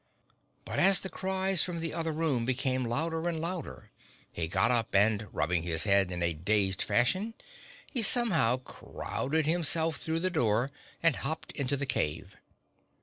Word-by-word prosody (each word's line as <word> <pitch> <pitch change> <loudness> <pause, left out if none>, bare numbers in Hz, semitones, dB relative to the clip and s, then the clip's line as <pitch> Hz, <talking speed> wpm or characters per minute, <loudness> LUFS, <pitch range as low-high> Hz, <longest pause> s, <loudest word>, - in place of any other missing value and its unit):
But - - -4
as 195 -1 +7
the 190 - -5
cries 190 -1 +1
from 175 -2 -3
the 165 -1 -4
other 165 -1 -3
room 150 -6 -1
became 130 +1 -1
louder 160 +7 -2
and 165 -2 -3
louder 170 -1 -6 0.4
he 80 - -4
got 95 +7 +1
up 115 -4 0
and 105 +1 +2
rubbing 85 +2 -1
his 80 -1 -1
head 100 -2 +2
in 90 -1 -4
a 85 0 0
dazed 95 +3 0
fashion 190 - 0 0.5
he 250 - -2
somehow 195 - +6
crowded 140 +3 -4
himself 160 -1 +1
through 160 +2 -3
the 185 +1 -1
door 120 -3 0 0.3
and 165 -3 +3
hopped 160 +3 -5
into 140 -1 -2
the 140 - -3
cave. 90 - -3
140 Hz, 160 wpm, -29 LUFS, 105-165 Hz, 0.5 s, as